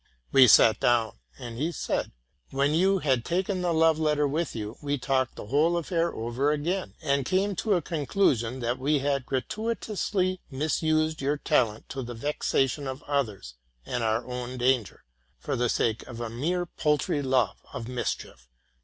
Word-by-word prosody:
'' -, -, -41 dB
We 130 Hz, -2 st, +8 dB
sat 110 Hz, 0 st, +6 dB
down; 115 Hz, -, +1 dB, 0.2 s
and 120 Hz, -1 st, -7 dB
he 160 Hz, +4 st, 0 dB
said, -, -, -2 dB, 0.2 s
'* 70 Hz, -4 st, -44 dB
When 140 Hz, +2 st, +1 dB
you 190 Hz, +4 st, +3 dB
had 130 Hz, -9 st, +1 dB
taken 185 Hz, -, -1 dB
the 175 Hz, -1 st, +1 dB
love 160 Hz, -1 st, +3 dB
letter 150 Hz, -2 st, +2 dB
with 155 Hz, +3 st, -2 dB
you, 110 Hz, 0 st, -5 dB
we 145 Hz, -1 st, -1 dB
talked 130 Hz, -1 st, 0 dB
the -, -, -8 dB
whole 150 Hz, +9 st, +2 dB
affair 170 Hz, 0 st, 0 dB
over 120 Hz, +6 st, -1 dB
again, 170 Hz, +6 st, -2 dB
and 140 Hz, -2 st, +1 dB
came 195 Hz, +7 st, 0 dB
to 215 Hz, -3 st, +1 dB
a 175 Hz, -, 0 dB
conclusion 135 Hz, -, 0 dB
that 120 Hz, +2 st, -1 dB
we 145 Hz, +3 st, +2 dB
had 140 Hz, -2 st, -1 dB
gratuitously 190 Hz, -, -2 dB
misused 155 Hz, +2 st, 0 dB
your 145 Hz, +2 st, 0 dB
talent 110 Hz, -6 st, +1 dB
to 135 Hz, -, -4 dB
the 120 Hz, -1 st, -6 dB
vexation 140 Hz, +1 st, 0 dB
of 130 Hz, +2 st, -6 dB
others 110 Hz, -, -2 dB, 0.3 s
and 120 Hz, -2 st, -2 dB
our 110 Hz, +2 st, 0 dB
own 125 Hz, 0 st, -5 dB
danger, 125 Hz, -3 st, 0 dB, 0.3 s
for -, -, -3 dB
the 120 Hz, -1 st, +1 dB
sake 115 Hz, -1 st, 0 dB
of 120 Hz, -2 st, -8 dB
a 115 Hz, -1 st, -4 dB
mere 170 Hz, +9 st, -1 dB
paltry 150 Hz, -3 st, 0 dB
love 130 Hz, -7 st, +1 dB
of 115 Hz, -, -6 dB
mischief 120 Hz, -, -4 dB
140 Hz, 175 wpm, -27 LUFS, 120-160 Hz, 0.3 s, We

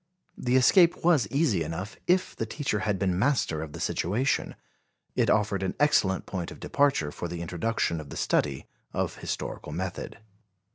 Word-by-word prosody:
The 125 Hz, 0 st, 0 dB
escape 170 Hz, +7 st, +5 dB
was 155 Hz, -11 st, +4 dB
easy 135 Hz, -, +1 dB
enough, 85 Hz, +6 st, -5 dB
if 185 Hz, +1 st, +2 dB
the 115 Hz, -, -3 dB
teacher 135 Hz, -4 st, -2 dB
had 105 Hz, -1 st, 0 dB
been 95 Hz, -2 st, 0 dB
master 115 Hz, -, +1 dB
of 80 Hz, -2 st, -7 dB
the -, -, -7 dB
situation. 120 Hz, +11 st, 0 dB, 0.6 s
It -, -, +2 dB
offered 105 Hz, -2 st, +2 dB
an 95 Hz, -, -2 dB
excellent 125 Hz, -11 st, +3 dB
point 90 Hz, -3 st, -4 dB
of -, -, -11 dB
departure 135 Hz, -, +1 dB
for 85 Hz, -, -5 dB
the 85 Hz, 0 st, -5 dB
introduction 85 Hz, -1 st, -1 dB
of 75 Hz, -, -11 dB
the -, -, -7 dB
study 70 Hz, -2 st, 0 dB, 0.3 s
of -, -, -2 dB
historical -, -, -5 dB
method. 90 Hz, +3 st, -4 dB
100 Hz, 170 wpm, -27 LUFS, 85-130 Hz, 0.6 s, escape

